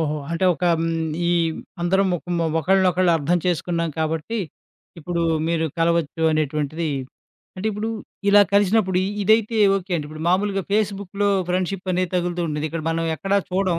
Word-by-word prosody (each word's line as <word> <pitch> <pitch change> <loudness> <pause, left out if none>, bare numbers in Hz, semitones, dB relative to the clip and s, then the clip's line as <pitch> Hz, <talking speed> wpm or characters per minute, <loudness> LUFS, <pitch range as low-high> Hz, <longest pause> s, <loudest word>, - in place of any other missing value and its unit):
ఓహో! 155 -1 -1
అంటే, 170 +2 -1
ఒక 160 - -4 0.2
హ్మ్. 165 - 0 0.4
ఈ - - +2 0.5
అందరం 190 +3 +2
మొకం 175 +1 -5
మొ 165 - +1
ఒకళ్ళనొకళ్ళు 185 0 +3
అర్థం 165 +4 +1
చేసుకున్నాం 170 -1 -1
కాబట్టి, 160 +7 -2 0.6
ఇప్పుడు 170 +1 -2 0.3
మీరు 160 -1 +1
కలవచ్చు 165 -1 +1
అనేటువంటిది 155 +1 -1 0.7
అంటే, 185 +3 -4
ఇప్పుడు 210 +2 -3 0.4
ఇలా 205 +1 +7
కలిసినప్పుడు 200 -2 +3 0.2
ఇదైతే 220 +2 +3 0.2
ఓకే 190 -1 -5
అండి, 150 -3 -4
ఇప్పుడు 155 +1 -8
మామూలుగా 195 +2 +1
ఫేస్‌బుక్‌లో 200 -1 0 0.2
ఫ్రెండ్‌షిపనేది 185 0 -1
తగులుతూ 175 0 -1
ఉంటుంది. 150 0 -2
ఇక్కడ 165 0 -4
మనం 165 0 -1
ఎక్కడ 195 +5 -4 0.2
చూడం, 185 -2 +1
175 Hz, 145 wpm, -22 LUFS, 165-195 Hz, 0.7 s, ఇలా